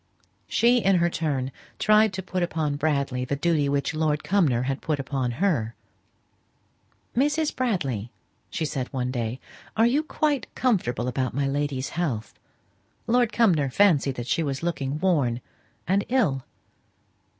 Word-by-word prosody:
She 240 +2 +4
in 195 -4 +3
her 175 -1 +2
turn 135 -6 -1 0.3
tried 215 0 +4
to 190 0 -4
put 185 0 -3
upon 160 -4 -1
Bradley 140 -4 0
the 130 +3 -1
duty 150 -1 +1
which 140 +2 0
Lord 155 -1 0
Cumnor 150 -8 +2
had 135 +1 -2
put 155 -3 -1
upon 135 -2 -2
her. 125 - 0 1.4
"Mrs. 295 +4 +1
Bradley," 140 - -1 0.4
she 160 - -2
said 135 -4 -3
one 125 -2 -2
day, 120 0 -3 0.4
"are 225 - +5
you 265 +6 +3
quite 305 -2 -1
comfortable 175 - 0
about 130 -1 -2
my 140 0 +1
lady's 140 -1 -1
health? 140 -11 -3 0.7
Lord 240 0 +2
Cumnor 170 - +3
fancied 145 -4 +3
that 120 - -5
she 165 - 0
was 140 -1 -2
looking 145 -5 -2
worn 145 -11 +1 0.5
and 195 +3 +2
ill?" 190 - +1
150 Hz, 145 wpm, -25 LUFS, 135-195 Hz, 1.4 s, are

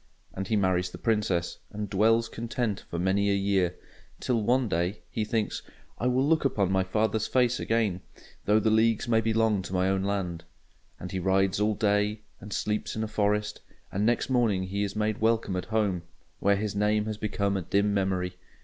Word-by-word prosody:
And 95 0 -4
he 110 - +1
marries 90 -3 +1
the - - -9
Princess, 105 -6 0
and 105 0 -4
dwells 115 +4 +3
content 115 -2 -3
for 85 - -4
many 95 +3 +1
a 100 - +3
year; 95 -3 +1 0.4
till 120 -3 0
one 125 +3 +2
day 90 +3 -1
he 110 - -1
thinks 110 -1 -1 0.4
"I 125 - 0
will 130 +2 +2
look 160 0 +3
upon 100 -8 +1
my 95 0 +2
father's 110 +3 0
face 125 -1 +2
again, 110 -5 0 0.4
though 105 +1 +4
the 110 +1 +2
leagues 110 0 +3
be 115 -1 +2
long 110 -3 +2
to 90 0 -8
my 90 0 +2
own 95 0 +1
land." 95 -4 -2 0.6
And 90 - -7
he 95 - -2
rides 95 +1 +2
all 105 0 +2
day, 105 +1 +1 0.2
and 105 - -10
sleeps 105 +1 -2
in 110 - -2
a - - -2
forest; 105 0 0 0.3
and 100 +2 -1
next 120 +2 +2
morning 115 -7 +2
he 95 +2 -3
is 100 0 -2
made 105 0 -1
welcome 110 -3 +1
at 90 - -3
home, 105 -5 0 0.4
where 100 +1 +3
his 105 0 -3
name 105 +1 +2
has 110 -1 -4
become 100 -1 -1
a 95 - -1
dim 100 +4 +1
memory. 95 -2 0
105 Hz, 195 wpm, -28 LUFS, 95-110 Hz, 0.6 s, though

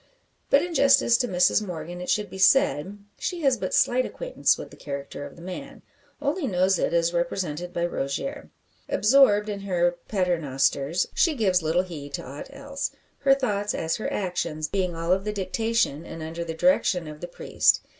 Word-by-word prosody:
But 280 - +5
in 350 -1 -4
justice 275 -5 +5
to 245 - 0
Mrs 180 +2 +3
Morgan 175 -1 -6
it 180 - -6
should 210 -1 +1
be 190 - -8
said, 195 - +3 0.2
she 350 -2 -3
has 270 -3 +3
but 190 -5 -4
slight 255 +1 +3
acquaintance - - 0
with - - -9
the - - -12
character 140 0 -6
of 140 - -14
the 170 - -13
man 180 0 -8 0.4
only 295 +1 -1
knows 185 -2 +2
it - - 0
as 170 0 +2
represented 175 -1 -2
by 170 0 -1
Rogier. 175 - -4 0.4
Absorbed 210 -3 +4
in 205 -1 -3
her 175 -3 0
paternosters, 155 -5 +1
she 330 -4 +2
gives 190 -7 +2
little 165 +3 +1
heed 145 -6 -7
to - - -6
ought 140 - -8
else; 280 0 -4 0.3
her 270 -1 +5
thoughts, 210 -6 -1
as 160 0 -1
her 215 - -3
actions, 170 -5 -2
being 180 -1 -1
all 165 +1 -2
of 190 +1 +2
the 210 - -2
dictation, 210 -4 -1
and 165 -1 -8
under 165 +2 -5
the 165 -1 -5
direction, 185 - +2
of 150 0 -9
the 175 - -5
priest. 175 - +2
185 Hz, 185 wpm, -25 LUFS, 165-225 Hz, 0.4 s, But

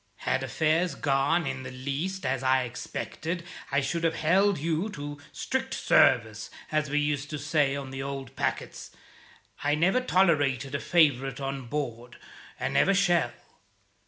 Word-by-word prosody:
Had 135 - +1
affairs 155 +5 +1
gone 140 +4 +1
in 130 -1 -3
the 130 - -7
least 140 +9 -4
as 130 0 0
I 130 0 +3
expected, 155 +7 -5 0.3
I 140 +1 +2
should 165 +4 -2
have 165 -1 +2
held 190 +5 +3
you 165 +6 -1
to 145 -6 -7
'strict - - -2
service,' 110 -2 +3 0.2
as 155 -1 0
we 145 - 0
used 145 -1 0
to 150 - -4
say 145 -1 +1
on 135 -2 -6
the 135 0 -5
old 135 -1 -6
packets. - - -3 0.7
I 145 +1 +2
never 185 +11 +3
tolerated 145 - +2
a 140 - 0
favourite 135 -7 +2
on 135 -2 -4
board, 120 -3 -4 0.4
and - - -2
never 165 +8 +4
shall. 175 -10 +3
145 Hz, 155 wpm, -28 LUFS, 135-165 Hz, 0.7 s, never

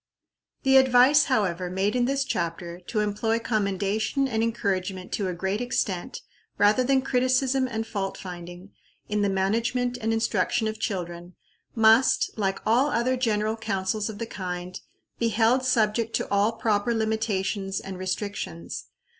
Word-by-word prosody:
The 270 -1 +6
advice, 265 +3 +6
however, 185 - 0
made 195 +5 0
in 245 -1 +2
this 275 +1 +1
chapter, 170 -5 -3
to 215 - 0
employ 210 +2 0
commendation 215 +3 0
and 225 -4 -1
encouragement 195 -5 -2
to 200 - -1
a 180 - -3
great 190 +5 -2
extent, 200 -7 -2 0.4
rather 210 +5 +4
than 265 +1 +2
criticism 255 +1 +1
and 225 -2 -3
fault 195 -3 -4
finding, 175 +1 -9 0.4
in 210 0 0
the 200 - +2
management 235 +6 0
and 225 +1 0
instruction 225 +1 +1
of 215 0 -4
children, 175 -4 -4 0.4
must, 225 +3 +4
like 195 -3 -1
all 245 +6 +3
other 255 0 +1
general 220 -3 0
counsels 205 -1 -2
of 215 - -7
the 230 - -3
kind, 180 -3 -6 0.4
be 230 - +2
held 230 +4 +3
subject 225 -2 +1
to - - -1
all 200 +3 +2
proper 220 +1 0
limitations 210 -3 -1
and 190 -1 -8
restrictions. 185 - -4
215 Hz, 145 wpm, -26 LUFS, 190-235 Hz, 0.4 s, The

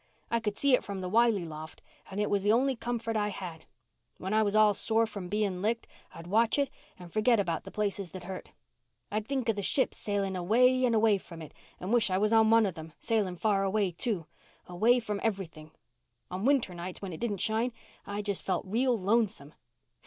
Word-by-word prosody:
I 230 - +2
could 210 -2 -3
see 280 -2 +4
it 250 - +4
from 200 -2 -5
the 180 - -4
Wiley 225 -3 +3
loft 155 -1 -9 0.3
and 195 - -5
it 210 - +1
was 200 -1 +1
the 205 +2 +3
only 260 +4 +3
comfort 230 -1 -3
I 210 -1 +1
had. 180 -5 -7 0.5
When 190 +3 -4
I 220 - +4
was 205 -1 +1
all 215 -1 +6
sore 225 +3 +2
from 200 -5 -7
being 200 -3 -1
licked 225 +3 -1 0.3
I'd 165 0 -9
watch 220 +7 +2
it 280 -1 +1 0.3
and 175 -2 -12
forget 220 +1 +3
about 170 -5 -1
the - - -9
places 200 -3 -2
that 185 +2 -9
hurt. 190 0 -8 0.6
I'd 215 +1 -2
think 270 -3 -2
of 225 - +2
the 205 - -3
ships 260 +7 +2
sailing 200 -2 -1
away 250 +8 +3
and 235 -2 +2
away 215 -2 +4
from 170 -2 -11
it 155 -2 -10 0.3
and 190 +5 -3
wish 235 -4 +4
I 185 - +1
was 210 +3 +2
on 220 -1 +5
one 225 -1 +5
of 190 - -2
them 160 -1 -10
sailing 205 -5 0
far 200 0 +1
away 195 -1 +1
too—away 180 +4 -1
from 210 -2 -3
everything. 180 -8 -3 0.6
On 185 +4 -3
winter 265 -9 +2
nights 175 +1 -6
when 185 -3 -5
it 160 - -7
didn't 220 -4 -2
shine, 220 +5 +1 0.4
I 205 +1 -3
just 200 -2 -2
felt 185 -2 -2
real 240 +5 +1
lonesome. 195 -7 0
205 Hz, 210 wpm, -30 LUFS, 185-225 Hz, 0.6 s, all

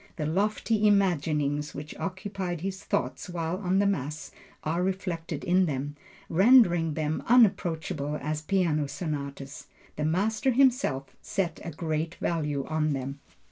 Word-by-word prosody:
The 155 - -3
lofty 210 +5 +1
imaginings 150 -7 +1
which 145 +2 -7
occupied 190 -3 -4
his 190 +1 -4
thoughts 205 - -2
while 170 0 -2
on 190 -1 0
the 200 - +3
Mass 155 -5 -2 0.3
are 165 +3 0
reflected 185 -3 -3
in 180 +1 +3
them, 145 0 -3 0.3
rendering 175 - +5
them 155 0 -1
unapproachable 165 - +2
as 155 0 -3
piano 155 -4 +1
sonatas. 140 -3 -5 0.3
The 150 - -1
master 210 +10 +1
himself, 245 - +2
set 185 -5 -2
a - - -4
great 160 +1 -2
value 150 -5 -1
on 155 -1 0
them. 135 +1 -4
165 Hz, 135 wpm, -28 LUFS, 150-190 Hz, 0.3 s, rendering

